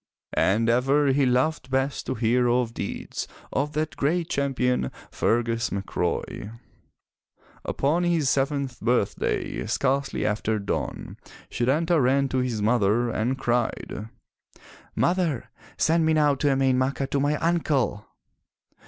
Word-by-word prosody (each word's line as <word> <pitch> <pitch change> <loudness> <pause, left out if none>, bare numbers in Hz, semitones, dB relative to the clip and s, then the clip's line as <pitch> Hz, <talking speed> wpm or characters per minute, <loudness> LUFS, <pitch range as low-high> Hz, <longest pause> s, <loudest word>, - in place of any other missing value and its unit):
And 110 +4 +2
ever 135 +5 +3
he 135 0 +3
loved 130 +3 +1
best 135 +1 -1
to 130 - -1
hear 120 +2 +2
of 120 -1 +1
deeds 100 - -5 0.3
of 145 +3 -1
that 155 +1 -2
great 165 +4 0
champion 125 - 0 0.2
Fergus 115 0 0
MacRoy. 100 +3 -3 1.1
Upon 155 +6 0
his 170 -5 +1
seventh 135 -1 0
birthday, 120 -3 0
scarcely 135 +1 0
after 110 +1 0
dawn, 100 -1 -4 0.3
Setanta 155 +6 +2
ran 135 +2 +2
to 130 - 0
his 120 -5 -1
mother, 115 +1 +2
and 120 +5 -1
cried: 120 -3 -2 0.9
"Mother, 175 -7 0 0.3
send 165 +1 +3
me 160 - +3
now 150 -2 +4
to 140 +2 -1
Emain 135 -1 +2
Macha 135 +1 0
to 140 +1 -1
my 145 +2 +1
uncle! 150 -10 0
130 Hz, 125 wpm, -25 LUFS, 120-145 Hz, 1.1 s, now